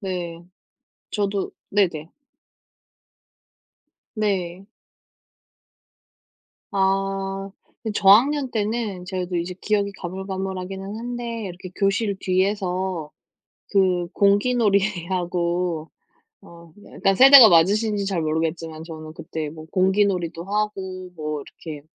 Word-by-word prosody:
네. 175 Hz, -4 st, -5 dB, 0.7 s
저도 200 Hz, -2 st, -1 dB, 0.2 s
네네. 170 Hz, -6 st, 0 dB, 2.0 s
네. 195 Hz, -3 st, -2 dB, 2.1 s
아 195 Hz, 0 st, -1 dB, 0.3 s
그 220 Hz, -2 st, -3 dB
저학년 250 Hz, +8 st, +5 dB
때는 210 Hz, -4 st, -2 dB
저도 180 Hz, -1 st, -3 dB
이제 175 Hz, +2 st, -3 dB
기억이 200 Hz, -1 st, 0 dB
가물가물하기는 190 Hz, +1 st, -5 dB
한데 235 Hz, -1 st, -5 dB
이렇게 180 Hz, 0 st, -8 dB
교실 200 Hz, +1 st, +1 dB
뒤에서 185 Hz, -3 st, -1 dB, 0.6 s
그 185 Hz, -3 st, +2 dB
공기놀이하고 185 Hz, -6 st, +1 dB, 0.5 s
어 170 Hz, -1 st, -15 dB, 0.2 s
약간 195 Hz, 0 st, +1 dB
세대가 265 Hz, -1 st, +10 dB
맞으신지 200 Hz, +4 st, +3 dB
잘 185 Hz, -4 st, -1 dB
모르겠지만 160 Hz, 0 st, -2 dB
저는 155 Hz, -2 st, -9 dB
그때 160 Hz, -2 st, -5 dB
뭐 155 Hz, 0 st, -11 dB
공기놀이도 185 Hz, -3 st, +1 dB
하고 190 Hz, -2 st, -3 dB
뭐 155 Hz, -2 st, -4 dB
이렇게 150 Hz, 0 st, -10 dB
190 Hz, 205 characters per minute, -23 LUFS, 170-205 Hz, 2.1 s, 세대가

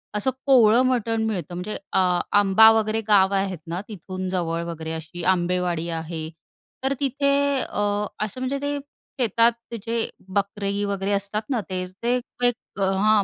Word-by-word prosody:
असं 210 Hz, +5 st, +1 dB, 0.2 s
कोवळं 240 Hz, -4 st, +6 dB
मटण 230 Hz, -3 st, +1 dB
मिळतं. 185 Hz, -5 st, -3 dB
म्हणजे 185 Hz, +4 st, -4 dB, 0.2 s
अ, 180 Hz, -2 st, +3 dB, 0.2 s
आंबा 205 Hz, +3 st, +7 dB
वगैरे 220 Hz, +1 st, -1 dB
गाव 200 Hz, -2 st, +5 dB
आहेत 195 Hz, -1 st, 0 dB
ना, 175 Hz, +3 st, -3 dB
तिथून 185 Hz, -2 st, -6 dB
जवळ 170 Hz, -2 st, -1 dB
वगैरे 160 Hz, 0 st, -6 dB
अशी 160 Hz, +2 st, -7 dB
आंबेवाडी 175 Hz, -2 st, +1 dB, 0.2 s
आहे. 160 Hz, -1 st, -5 dB, 0.5 s
तर 270 Hz, -, +2 dB
तिथे 280 Hz, 0 st, +1 dB, 0.3 s
अ, -, -, -3 dB, 0.4 s
असं 215 Hz, +5 st, -8 dB
म्हणजे 260 Hz, +2 st, -1 dB
ते 285 Hz, 0 st, -1 dB, 0.4 s
शेतात 230 Hz, 0 st, +4 dB, 0.2 s
ते 235 Hz, -, -4 dB
जे 230 Hz, 0 st, -1 dB, 0.2 s
बकरे 200 Hz, 0 st, -1 dB
वगैरे 200 Hz, 0 st, -2 dB
असतात 200 Hz, +1 st, -1 dB
ना, 255 Hz, -4 st, +1 dB
ते 185 Hz, 0 st, -2 dB, 0.2 s
ते 240 Hz, +1 st, +2 dB, 0.3 s
एक 245 Hz, -, +2 dB, 0.3 s
हां, 200 Hz, +2 st, +3 dB
200 Hz, 155 wpm, -24 LUFS, 180-225 Hz, 0.5 s, आंबा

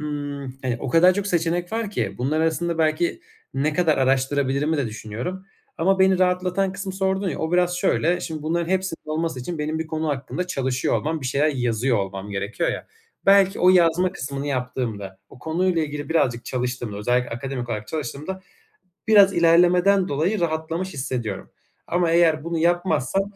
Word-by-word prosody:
ımm, 145 Hz, -3 st, -5 dB
hani, 125 Hz, -2 st, -1 dB
o -, -, -4 dB
kadar 170 Hz, +7 st, +6 dB
çok 200 Hz, 0 st, -2 dB
seçenek 175 Hz, 0 st, -1 dB
var 225 Hz, -2 st, -2 dB
ki. 110 Hz, -, -2 dB
Bunlar 145 Hz, +5 st, 0 dB
arasında 165 Hz, +1 st, 0 dB
belki 160 Hz, +1 st, +1 dB, 0.3 s
ne 145 Hz, +3 st, +1 dB
kadar 160 Hz, 0 st, +2 dB
araştırabilirimi 135 Hz, +3 st, +1 dB
de 140 Hz, -4 st, 0 dB
düşünüyorum 110 Hz, -, -6 dB, 0.3 s
ama 190 Hz, +4 st, +2 dB
beni 190 Hz, -1 st, +4 dB
rahatlatan 185 Hz, +1 st, +1 dB
kısmı 190 Hz, 0 st, -5 dB
sordun 190 Hz, 0 st, 0 dB
ya, -, -, -4 dB
o 160 Hz, +1 st, -2 dB
biraz 180 Hz, 0 st, +2 dB
şöyle: 175 Hz, 0 st, +1 dB
Şimdi 155 Hz, -2 st, -5 dB
bunların 170 Hz, +2 st, -1 dB
hepsinin 190 Hz, -4 st, -2 dB
olması 160 Hz, -4 st, -2 dB
için 165 Hz, +6 st, -5 dB
benim 155 Hz, +1 st, -2 dB
bir 160 Hz, -, -3 dB
konu 160 Hz, 0 st, -2 dB
hakkında 145 Hz, +5 st, -3 dB
çalışıyor 130 Hz, -7 st, -1 dB
olmam, 160 Hz, +1 st, -2 dB
bir 130 Hz, -, -4 dB
şeyler 140 Hz, +4 st, +2 dB
yazıyor 125 Hz, -3 st, 0 dB
olmam 95 Hz, +1 st, -4 dB
gerekiyor 100 Hz, +2 st, -2 dB
ya, -, -, -5 dB, 0.4 s
belki 195 Hz, 0 st, +5 dB
o 180 Hz, -, +6 dB
yazma 180 Hz, 0 st, +3 dB
kısmını 140 Hz, -3 st, -5 dB
yaptığımda, 125 Hz, -8 st, -3 dB
o 135 Hz, -, -15 dB
konuyla 165 Hz, +4 st, 0 dB
ilgili 145 Hz, -1 st, -5 dB
birazcık 125 Hz, -8 st, +1 dB
çalıştığımda, 125 Hz, -4 st, -3 dB
özellikle 125 Hz, +3 st, 0 dB
akademik 125 Hz, 0 st, -4 dB
olarak 105 Hz, -2 st, -4 dB
çalıştığımda 155 Hz, +5 st, -5 dB, 0.7 s
biraz 200 Hz, -3 st, +6 dB
ilerlemeden 180 Hz, +3 st, +4 dB
dolayı 170 Hz, +9 st, 0 dB
rahatlamış 165 Hz, +3 st, -2 dB
hissediyorum 125 Hz, -, -4 dB, 0.4 s
ama 175 Hz, -1 st, +1 dB
eğer 165 Hz, -2 st, +3 dB
bunu 170 Hz, 0 st, -2 dB
yapmazsam, 175 Hz, -1 st, +1 dB
160 Hz, 165 wpm, -23 LUFS, 130-180 Hz, 0.7 s, kadar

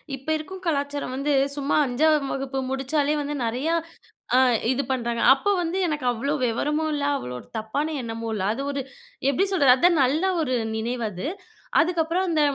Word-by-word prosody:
இப்ப 270 Hz, +2 st, -16 dB
இருக்கும் 370 Hz, +5 st, -8 dB
கலாச்சாரம் 285 Hz, -4 st, -1 dB
வந்து 280 Hz, +2 st, 0 dB, 0.2 s
சும்மா 285 Hz, 0 st, 0 dB
5 285 Hz, +2 st, +2 dB
வகுப்பு 270 Hz, 0 st, -3 dB
முடிச்சாலே 280 Hz, +2 st, 0 dB
வந்து 290 Hz, +1 st, -3 dB
நெறையா 260 Hz, +9 st, 0 dB, 0.6 s
அ -, -, +6 dB, 0.3 s
இது 265 Hz, +2 st, 0 dB
பண்றாங்க. 235 Hz, -2 st, -1 dB
அப்ப 275 Hz, +9 st, -5 dB
வந்து 340 Hz, +2 st, -2 dB
எனக்கு 300 Hz, -5 st, -2 dB
அவ்ளோ 245 Hz, +5 st, -2 dB
வெவரமும் 300 Hz, +7 st, 0 dB
இல்ல, 290 Hz, -1 st, -2 dB
அவ்ளோ 125 Hz, -, -6 dB
ஒரு -, -, -15 dB
தப்பான 220 Hz, +8 st, -2 dB
எண்ணமும் 230 Hz, -1 st, -5 dB
இல்ல. 205 Hz, -3 st, -2 dB
அது 255 Hz, -, -5 dB
ஒரு 280 Hz, -1 st, -2 dB, 0.5 s
எப்டி 375 Hz, +9 st, +2 dB
சொல்றது? 285 Hz, -9 st, +6 dB
அதான் 340 Hz, +2 st, +4 dB
நல்ல 285 Hz, +7 st, +1 dB, 0.2 s
ஒரு 255 Hz, -5 st, -1 dB, 0.2 s
நினைவு 235 Hz, +2 st, -2 dB
அது. 185 Hz, +8 st, -5 dB, 0.5 s
அதுக்கப்புறம் 340 Hz, +1 st, +1 dB
அந்த 320 Hz, -2 st, +2 dB
280 Hz, 165 wpm, -24 LUFS, 250-310 Hz, 0.6 s, அ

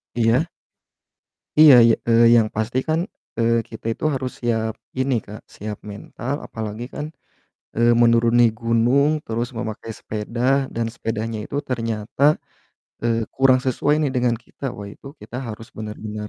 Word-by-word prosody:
Iya. 120 Hz, +7 st, +2 dB, 1.1 s
Iya, 155 Hz, -3 st, +10 dB
y -, -, +6 dB, 0.2 s
eee, 115 Hz, +1 st, +6 dB
yang 110 Hz, -, +3 dB
pasti 110 Hz, +4 st, -1 dB
kan, 160 Hz, +1 st, +1 dB, 0.4 s
eee, 115 Hz, 0 st, +2 dB
kita 110 Hz, -, -11 dB
itu -, -, -13 dB
harus 130 Hz, -1 st, -3 dB
siap 110 Hz, -2 st, 0 dB, 0.3 s
ini 130 Hz, 0 st, +1 dB
Kak, 105 Hz, +2 st, -10 dB
siap 105 Hz, 0 st, -6 dB
mental, 120 Hz, +5 st, -6 dB
apalagi 110 Hz, +1 st, -6 dB
kan, 150 Hz, -, -3 dB, 0.7 s
eee, 120 Hz, +1 st, +4 dB
menuruni 115 Hz, 0 st, +4 dB, 0.2 s
gunung 120 Hz, +6 st, +3 dB, 0.2 s
terus 115 Hz, +2 st, -2 dB
memakai 110 Hz, -1 st, -5 dB
sepeda, 110 Hz, +3 st, -6 dB, 0.3 s
dan 115 Hz, 0 st, -1 dB
sepedanya 115 Hz, 0 st, -3 dB
itu 140 Hz, -, -5 dB
ternyata, 115 Hz, 0 st, -3 dB, 0.8 s
eee, 115 Hz, -1 st, +1 dB
kurang 130 Hz, -1 st, +4 dB
sesuai 135 Hz, +3 st, +1 dB
nih 145 Hz, -, +1 dB
dengan 120 Hz, -1 st, +2 dB
kita. -, -, -13 dB
Wah 100 Hz, -1 st, -8 dB
itu 135 Hz, -, -15 dB
kita 110 Hz, +3 st, -8 dB
harus 110 Hz, +1 st, -8 dB
benar-benar 105 Hz, 0 st, -6 dB
115 Hz, 145 wpm, -22 LUFS, 110-125 Hz, 1.1 s, Iya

